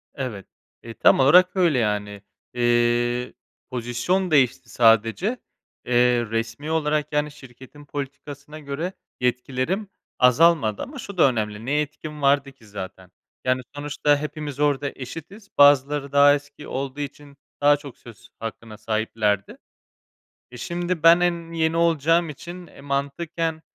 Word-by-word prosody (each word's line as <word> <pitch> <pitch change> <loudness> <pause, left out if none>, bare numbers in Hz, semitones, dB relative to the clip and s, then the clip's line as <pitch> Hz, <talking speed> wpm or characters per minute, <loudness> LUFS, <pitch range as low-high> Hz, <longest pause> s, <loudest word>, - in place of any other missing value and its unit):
Evet, 120 -9 -5 0.4
eee, 115 - -8
tam - - +4
olarak 180 +8 +6
öyle, 170 -8 +3
yani. 105 -2 -2 0.3
Eee, 120 0 +1 0.4
pozisyon 130 +10 -1
değişti 130 -3 +2
sadece. 115 - +3 0.5
Eee, 120 -1 +3
resmî 115 +7 -3
olarak, 150 -2 0
yani, 150 0 0
şirketin 135 +2 -14
politikasına 145 +1 -7
göre 155 +6 -4 0.3
yetkilerim 130 - -1 0.3
azalmadı 125 -3 +4
ama 275 -1 -7
şu 200 -5 -8
da 140 - +6
önemli. 105 -2 -3
Ne 130 - -3
yetkim 150 +1 -3
vardı 140 0 +2
ki 130 -5 -21
zaten? 95 -2 -9 0.3
Yani, 130 0 +1
sonuçta 145 0 +1
hepimiz 150 -1 -6
orada 145 -1 +1
eşitiz. 170 - -9
Bazıları 145 0 +4
daha 145 0 +6
eski 145 0 -9
olduğu 135 +1 -4
için 145 0 -8 0.2
daha 145 0 +5
çok 140 -3 -11
söz 115 -4 -15
hakkına 115 0 -7
sahiplerdi. 110 -2 -1 0.9
E, 125 - -10
şimdi 175 +2 -3
ben 165 +1 +8
en 170 -1 -1
yeni 160 0 0
olacağım 165 0 +2
için 175 +4 -9
e, - - -15
mantıken 155 +4 -3
140 Hz, 130 wpm, -23 LUFS, 120-155 Hz, 0.9 s, ben